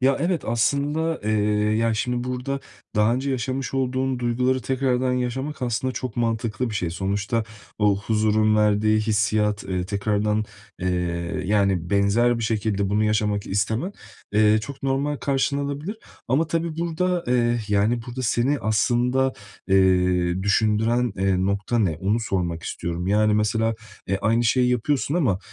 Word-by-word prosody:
Ya, 135 +1 +3
evet, 170 -2 0
aslında, 145 +7 0
eee, 110 - 0 0.5
ya, 115 0 +1
şimdi 125 +2 -1
burada 125 +2 -3 0.4
daha 105 +2 +3
önce 135 +2 -2
yaşamış 130 +2 -2
olduğun 130 0 0
duyguları 125 +1 0
tekrardan 130 -1 0
yaşamak 130 +3 -3
aslında 125 +2 -1
çok 125 -2 -5
mantıklı 115 0 -1
bir 110 - -5
şey. 90 -4 -1
Sonuçta 100 +5 -1 0.3
o 105 -2 +3
huzurun 110 0 +2
verdiği 105 0 +3
hissiyat, 105 -1 +1
eee, 90 -1 -2
tekrardan, 105 +1 0 0.4
eee, 90 - -1 0.6
yani 95 -4 +1
benzer 105 +4 +3
bir 115 - -4
şekilde 105 -3 0
bunu 105 +1 +2
yaşamak 105 -1 0
istemen, 110 - -1 0.4
eee, 105 0 +4
çok 135 +6 -8
normal 135 +2 0
karşılanabilir 140 +6 -1 0.3
ama 140 +7 +2
tabii 165 0 -2
burada, 170 +1 -1
eee, 120 -1 +2
yani 105 +4 +1
burada 125 +2 -5
seni 125 +4 +1
aslında, 125 +4 +1 0.4
eee, 90 -1 +3
düşündüren, 110 +3 +2
eee, 95 -1 +1
nokta 100 +4 0
ne, 95 -8 +1
onu 105 +4 +1
sormak 90 -6 -2
istiyorum. 85 +1 -4
Yani 105 +1 +3
mesela, 110 +2 +1 0.3
eee, 95 0 0
aynı 115 +2 +2
şeyi 125 +2 +3
yapıyorsun 135 +4 0
ama, 130 - +2
115 Hz, 145 wpm, -23 LUFS, 105-130 Hz, 0.6 s, eee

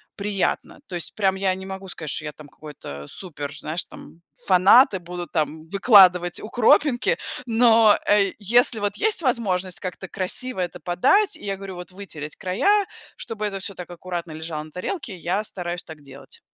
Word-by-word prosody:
приятно. 200 -2 -2
То 180 - -6
есть 175 - -3
прям 195 -2 +1
я 190 -1 +1
не 190 0 -7
могу 190 0 -7
сказать, 160 -3 -6
что 155 - -2
я, 150 - -4
там 150 0 -14
какой-то 100 - -10
супер, 145 - -6
знаешь, 155 +4 -4
там, 170 - -14 0.3
фанат 195 +7 +6
и - - 0
буду, 175 0 -7
там, 155 0 -3
выкладывать 185 -4 +5
укропинки, 245 - +3 0.3
но, 225 -2 +5
э, 200 -2 +4
если, 230 +2 +3
вот, 205 0 -2
есть 435 -3 +1
возможность 195 - 0
как-то 190 0 -6
красиво 200 +6 -3
это 180 0 -3
подать, 180 - +2
и - - -12
я 195 -1 -2
говорю, 195 -1 -8
вот, 180 +1 -9
вытереть 165 -6 -8
края, 395 - +1 0.3
чтобы 215 -1 -5
это 195 -2 -3
всё 195 +1 -5
так 180 -1 -9
аккуратно 175 -1 -6
лежало 160 -1 -5
на 155 - -14
тарелке, 210 - -5
я 185 +5 -1
стараюсь 175 -2 -4
так 160 -3 -12
делать. 140 -1 -14
185 Hz, 180 wpm, -23 LUFS, 170-210 Hz, 0.3 s, фанат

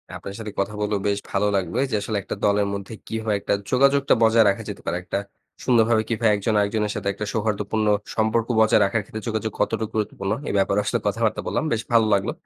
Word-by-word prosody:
আপনার 100 - -7
সাথে 110 -2 -6
কথা 100 +2 -1
বলেও 105 -1 0
বেশ 100 0 +1
ভালো 100 +1 +1
লাগবে 90 -3 -1
যে - - +1
আসলে 105 +1 -2
একটা - - -5
দলের 100 0 +3
মধ্যে 100 +2 -6
কিভাবে 110 -1 -2
একটা - - -1 0.2
যোগাযোগটা 140 +2 +4
বজায় 115 0 +5
রাখা 100 - -1
যেতে - - -7
পারে? 90 - -1
একটা - - -3 0.5
সুন্দরভাবে 115 -2 +3
কিভাবে 115 -1 +2
একজন 100 +2 -1
আরেকজনের 105 +1 0
সাথে - - -4
একটা 105 +2 -5
সৌহার্দ্যপূর্ণ 110 0 -1 0.3
সম্পর্ক 110 +1 +1
বজায় 110 +1 +5
রাখার 110 +3 0
ক্ষেত্রে 110 +2 -8
যোগাযোগ 110 -1 -2
কতটুক 110 -1 0
গুরুত্বপূর্ণ? 100 -2 -2 0.2
এ - - 0
ব্যাপারে 100 +1 +2
আসলে 100 - 0
কথাবার্তা 110 +2 0
বললাম। - - -1
বেশ 115 -1 +1
ভালো 115 -1 +5
লাগলো। 100 +4 +1
110 Hz, 200 wpm, -23 LUFS, 100-115 Hz, 0.5 s, বজায়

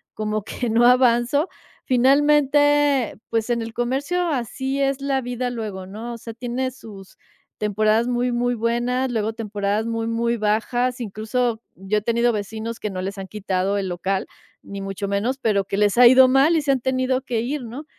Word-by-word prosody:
como 215 -1 -2
que 245 +2 -4
no 235 +2 +4
avanzo, 250 +5 +3 0.4
finalmente, 290 -1 +3
pues 225 +1 -1
en 235 -1 0
el 225 0 -6
comercio 270 +9 -1
así 265 0 -2
es 275 0 0
la 275 -1 0
vida 245 0 -3
luego, 210 -5 -5
¿no?, 220 +5 -7
o 235 - -7
sea, 230 0 -9
tiene 250 +2 -3
sus 205 -6 -13 0.4
temporadas 215 +2 +1
muy, 245 0 0
muy 245 0 0
buenas, 240 +3 0
luego 220 -1 -1
temporadas 210 -1 -2
muy, 230 0 -2
muy 235 +1 0
bajas. 240 +4 0
Incluso 225 +1 -2
yo 195 +3 -1
he - - -15
tenido 235 +2 +1
vecinos 220 +2 -4
que 210 - -3
no 185 -1 -5
les 195 +2 -5
han 190 -1 -6
quitado 195 0 -1
el 195 - -2
local, 190 +2 -2 0.4
ni 200 0 -7
mucho 195 +1 -4
menos, 205 +7 -1
pero 215 -6 +1
que 195 +1 -4
les 205 +1 +2
ha 245 - +8
ido 260 +1 +7
mal 275 +6 +4
y - - +1
se 285 -1 +1
han 265 -3 0
tenido 260 0 0
que 235 -4 -2
ir, 270 +3 -3
¿no?, 255 +7 -8
235 Hz, 185 wpm, -22 LUFS, 210-255 Hz, 0.4 s, ha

